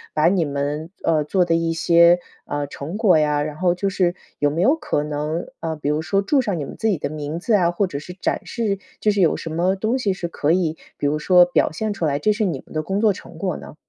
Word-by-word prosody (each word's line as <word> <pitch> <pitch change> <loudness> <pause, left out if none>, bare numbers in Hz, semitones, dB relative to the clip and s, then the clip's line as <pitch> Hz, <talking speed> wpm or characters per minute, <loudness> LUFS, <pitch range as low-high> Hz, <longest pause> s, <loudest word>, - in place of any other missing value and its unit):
把 150 - +3
你 180 -1 +3
们， 145 +2 -3
呃， 160 -2 +2
做 180 +4 +1
的 165 - +1
一 165 0 +1
些， 170 +1 +5 0.3
呃， 145 0 -2
成 145 +6 -6
果 195 -8 +4
呀， 150 -1 +1
然 150 0 -5
后 175 +1 +2
就 195 +2 -1
是 185 -2 +1 0.2
有 145 - +3
没 165 +4 0
有 270 +9 +4
可 150 - -1
能， 150 +3 -3
呃， 160 -1 -3
比 145 -1 -3
如 150 +1 0
说 195 +5 0
注 270 +7 +2
上 205 -8 -2
你 145 - -3
们 - - -9
自 220 - -1
己 200 - +2
的 145 - -3
名 150 +1 -5
字 225 - -1
啊， 180 -5 +4
或 175 +4 0
者 145 -6 -5
是 165 +4 -9
展 180 - -2
示， 210 -5 -2 0.2
就 210 - +3
是 200 -1 0
有 165 - +3
什 165 - -6
么 175 +4 +1
东 220 +7 -1
西 200 -6 +1
是 180 -2 -4
可 155 -2 0
以， 165 -2 +1 0.2
比 - - -3
如 150 +1 +1
说 180 +3 +6
表 175 - +1
现 210 +6 -2
出 185 -4 -2
来， 140 -2 +1
这 210 +9 +2
是 215 +1 -1
你 165 -9 -2
们 - - -15
的 155 - 0
工 195 +5 -2
作 215 -2 +4
成 170 - -12
果 185 -1 -2
呢？ - - -11
170 Hz, 290 characters per minute, -21 LUFS, 150-195 Hz, 0.3 s, 说